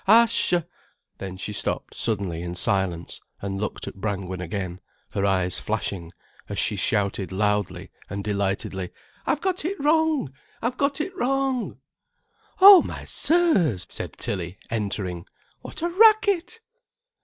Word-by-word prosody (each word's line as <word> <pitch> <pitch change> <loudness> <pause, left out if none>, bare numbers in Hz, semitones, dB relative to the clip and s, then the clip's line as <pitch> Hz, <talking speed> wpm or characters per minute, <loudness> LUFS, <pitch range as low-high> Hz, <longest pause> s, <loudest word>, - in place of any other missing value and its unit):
Ascha!——" 210 -6 +4 0.5
Then 95 -1 -6
she 105 +2 -5
stopped - - -1
suddenly 95 -7 -1
in 85 0 -5
silence 90 -2 +1 0.2
and 95 0 -4
looked 105 - -4
at - - -5
Brangwen 95 -3 -3
again, 90 -1 -4 0.3
her 100 0 0
eyes 95 -2 +1
flashing, 85 -4 -3 0.4
as 100 - -4
she 105 - +1
shouted 100 -1 0
loudly 105 0 -1 0.2
and 100 +1 -4
delightedly: 100 -2 -2 0.4
"I've 300 - +1
got 370 -3 -1
it 375 +4 -3
wrong, 305 - +2 0.3
I've 245 +2 -2
got 280 +1 0
it 370 +4 -5
wrong." 270 -4 0 0.8
"Oh, 390 -1 +11
my - - -6
sirs," 195 - +2
said - - -5
Tilly 90 -1 -4
entering, 100 -5 -3 0.3
"what - - -8
a 345 - +1
racket!" 410 0 +4
105 Hz, 130 wpm, -25 LUFS, -, 0.8 s, Oh